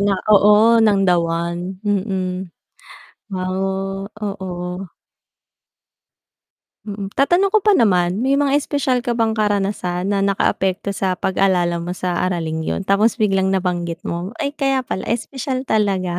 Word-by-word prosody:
na 200 -1 +2 0.2
oo 210 +3 +6
ng 210 -3 +4
the 180 -2 +4
one, 170 +2 -3
mm. 190 -2 -2 0.8
Oh, 190 +1 -2 0.2
oo. 185 -3 -5 1.9
Mm, 200 -2 -5
tatanong 350 +8 +3
ko - - +7
pa 420 - +5
naman 185 - +2
may 270 +3 +2
mga 280 -1 +1
espesyal 275 -3 0
ka 240 -1 -2
bang 225 -1 +1
karanasan 200 -3 -1
na 200 - +1
nakaapekto 195 0 0
sa 190 -2 -1
pag-alala 180 -3 +1
mo 175 +1 -4
sa 180 -2 -2
araling 160 -3 -2
yun. - - -2
Tapos 200 +4 +2
biglang 195 -4 +1
nabanggit 180 -3 -2
mo, 175 +6 -4
ay 280 - -2
kaya 270 -3 0
pala 190 - -4
espesyal 255 +2 -3
talaga. 195 -6 0
195 Hz, 135 wpm, -19 LUFS, 180-220 Hz, 1.9 s, ko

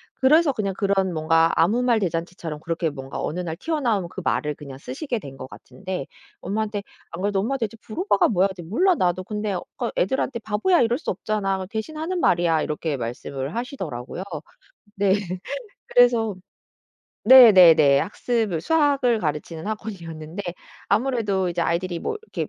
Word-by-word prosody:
그래서 300 +4 +4
그냥 205 -6 -2
그런 195 -2 +1
뭔가 165 +1 +3
아무 225 +9 +3
말 235 -3 +3
대잔치처럼 165 -3 -4
그렇게 165 -1 -1
뭔가 135 -2 -7
어느 175 - -3
날 165 -2 -4
튀어나온 240 - -1
그 190 - -7
말을 150 -1 0
그냥 140 -3 -10
쓰시게 265 - -4
된 135 -7 -10
것 130 - -8
같은데 185 +1 -7 0.3
엄마한테 210 +1 -2 0.3
안 170 +2 -6
그래도 200 -1 0
"엄마 265 +7 -1
대체 225 -2 -4
부로바가 280 - +1
뭐야?" 195 -2 +3
그랬더니 180 -4 -9
"몰라 360 - +3
나도. 180 - 0
근데 210 0 -3
어 180 - -3
그러니까 - - -2
애들한테 265 - -1
바보야 220 - +2
이럴 235 +1 +2
수 320 - -3
없잖아. 195 0 -1
그래서 185 -1 -6
대신하는 310 - -4
말이야." 170 - +2
이렇게 150 -1 -2
말씀을 130 +4 -5
하시더라고요. 190 - -5 0.7
네. 195 -1 +3 0.7
그래서 235 -4 +4 0.9
네네네. 180 - +8
학습을 215 -5 -1
수학을 280 - +2
가르치는 160 +3 -4
학원이었는데 175 -5 -6 0.5
아무래도 210 -5 +1
이제 175 0 -2
아이들이 170 +1 -1
뭐 445 - -3
이렇게 445 - -5
195 Hz, 390 characters per minute, -23 LUFS, 165-235 Hz, 0.9 s, 네네네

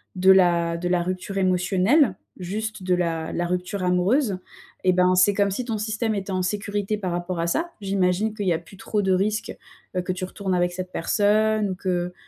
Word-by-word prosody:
de 190 +1 +5
la 170 -3 +4
de 175 +1 -3
la 180 -1 +1
rupture 185 +2 -4
émotionnelle, 190 - +3 0.2
juste 215 +3 -4
de 185 -1 +1
la 165 -2 -2
la 175 - -1
rupture 180 +2 -2
amoureuse 190 +5 +2 0.5
et 185 -1 +4
ben, 180 0 +3
c'est 185 +3 +5
comme 200 -1 +1
si 240 +5 -3
ton 225 -3 -2
système 215 +1 -1
était 195 0 -4
en 185 - 0
sécurité 205 +2 -2
par 185 -4 -3
rapport 175 0 -3
à 170 - 0
ça. 335 - -1
J'imagine 195 +2 +1
qu'il 205 -3 -3
y 175 - +4
a 160 - -1
plus 180 +3 -16
trop 210 +1 -1
de 190 -1 +1
risques, 210 +3 0 0.4
heu, 180 - +2
que 185 +1 -2
tu 185 +1 -6
retournes 190 0 -2
avec 175 0 +1
cette 185 0 -6
personne 210 +2 +2
ou - - -3
que 180 -1 -2
185 Hz, 210 wpm, -24 LUFS, 180-205 Hz, 0.5 s, de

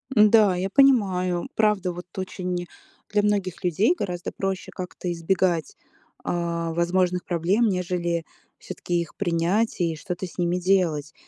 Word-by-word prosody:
М, 210 -1 +7
да, 210 -5 +5
я 185 +2 -2
понимаю. 190 -9 +3
Правда, 210 -4 +2
вот 175 +1 -8
очень 180 -2 -3 0.4
для 210 - +3
многих 200 -4 -1
людей 185 - +2
гораздо 180 - -4
проще 195 -1 -3
как-то 180 -1 -5
избегать, 170 -1 0 0.5
а, 170 -1 -2
возможных 180 +1 +1
проблем, 185 +7 +1
нежели 175 -3 -1 0.3
всё-таки 175 - -5
их 170 - -8
принять 185 +5 0
и 165 -2 0
что-то 180 +4 -5
с 180 - -15
ними 175 0 +1
делать. 175 -5 +1
180 Hz, 140 wpm, -24 LUFS, 170-195 Hz, 0.5 s, М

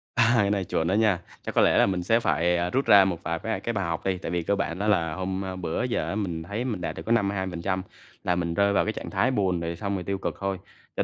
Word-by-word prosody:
À, 115 -1 +4
cái 100 -3 +3
này 100 -2 0
chuẩn 80 -1 -1
đó 95 - +1
nha. 105 -4 +3 0.2
Chắc - - -5
có - - +5
lẽ - - +4
là - - +6
mình 95 -2 -1
sẽ 115 +6 +3
phải, 90 -5 +1
à, 85 +1 0
rút 135 +7 0
ra 100 -2 +7
một 90 -3 -2
vài 85 0 -2
bái 110 +4 -2
cái 115 - -3
bài 100 -4 -1
học 85 -1 -3
đi, 95 -1 +1
tại 90 - -5
vì 85 -1 -1
cơ 100 - +1
bản 85 -2 -3
đó 105 - -1
là 85 -6 +2
hôm, 95 +3 -3
ơ, 95 -1 -4
bữa 85 +4 -2
giờ 125 -1 -1
á - - -2
mình 90 -6 -3
thấy 100 +7 -4
mình 110 -8 -3
đạt 85 - -3
được - - -7
có 115 - -2
52% 95 -4 0 0.4
là 90 - +1
mình 85 -1 -1
rơi 100 +3 +2
vào - - +3
cái 110 - -1
trạng - - -6
thái 105 +7 +1
buồn, 95 -7 +1
rồi 85 0 -3
xong 100 +3 -3
rồi 90 - -3
tiêu 100 +2 -2
cực - - -3
thôi, 95 -1 -2 0.4
cho - - +1
95 Hz, 305 wpm, -26 LUFS, 85-105 Hz, 0.4 s, ra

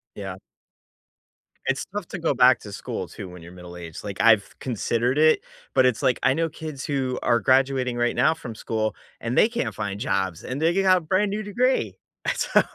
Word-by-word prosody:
Yeah. 95 -2 -6 1.3
It's 135 0 0
tough 200 -3 -5
to 195 - -5
go 165 -4 0
back 125 0 +6
to 105 - -10
school - - -5
too 95 - -8
when 90 -1 -11
you're 85 +1 -11
middle 90 -1 -11
aged. 85 -2 -8
Like, 100 -2 -6
I've 110 -4 +4
considered 120 +2 0
it, 155 - +5 0.3
but 130 - +5
it's, 125 0 +1
like, 130 -3 +2
I 130 - +4
know 165 +2 0
kids 155 -3 -7
who 130 -3 -1
are 120 -1 +3
graduating 130 +1 +2
right 120 0 0
now 155 - +4
from 120 -7 -8
school, 110 0 -2 0.3
and 115 +2 -3
they - - +6
can't 235 0 -3
find 100 0 -4
jobs, 95 -5 -1
and 130 +3 -4
they 165 +1 +3
got 185 -1 +5
a - - -6
brand 185 +5 +1
new 210 +2 -2
degree. 245 +6 0 0.4
So, - - +3
130 Hz, 200 wpm, -24 LUFS, 105-160 Hz, 1.3 s, back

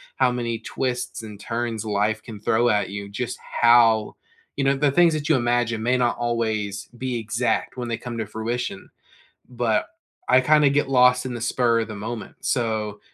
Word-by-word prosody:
how 130 -2 +3
many 120 -2 -2
twists 125 +1 -3
and 105 -2 -9
turns 115 0 -3
life 105 +1 0
can 110 -4 -9
throw 115 +3 +2
at 105 -3 +1
you, 100 0 -6
just 120 +4 -4 0.2
how, 115 -2 +5 0.4
you 140 - -1
know, 135 0 +3
the 145 +1 +2
things 170 +3 +4
that 150 -1 -3
you 155 - +5
imagine 120 -2 0
may 125 +2 +2
not 120 -1 +1
always 110 -4 -2
be 125 -1 -2
exact 115 +1 -1
when 120 -1 -4
they 115 - -1
come 120 -1 -7
to 110 - -2
fruition. 110 -1 -4 0.6
But - - 0 0.4
I 130 +1 +6
kinda 150 +1 +4
get 140 0 +1
lost 125 -1 +4
in 125 - -4
the 120 - -5
spur 120 -1 +2
of 115 - -3
the 110 - -6
moment. 110 +1 -6
So, 110 -4 -1
120 Hz, 185 wpm, -23 LUFS, 110-125 Hz, 0.6 s, I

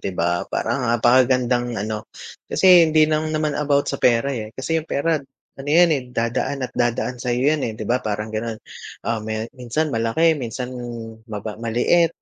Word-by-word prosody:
'di - - -3
ba, 85 +1 +1
parang 130 -3 -1
napakagandang 120 0 +3
ano 110 +1 -4 0.4
kasi 180 -3 +6
hindi 155 0 +5
lang 155 0 0
naman 155 -1 -1
about 140 -1 +2
sa 140 - -4
pera 125 +3 +3
eh, 110 -4 -4
kasi 160 +5 -1
'yong 155 - -15
pera, 155 +1 0 0.4
ano 140 - -7
yan 170 +3 +5
eh, 140 - 0
dadaan 125 +3 -2
at - - -6
dadaan 120 +1 -1
sa'yo 125 +4 +1
yan 155 - -1
eh, 110 -4 -3
'di 110 - -5
ba, 125 +4 +1
parang 110 0 -4
gano'n. 110 +1 -3 0.5
Ah, 115 0 -1
maya 110 0 -3
minsan 135 +4 -2
malaki, 115 +9 +2
minsan 125 -2 -5 0.6
maba 105 +1 -6
maliit, 120 +9 +2
125 Hz, 175 wpm, -21 LUFS, 115-150 Hz, 0.6 s, kasi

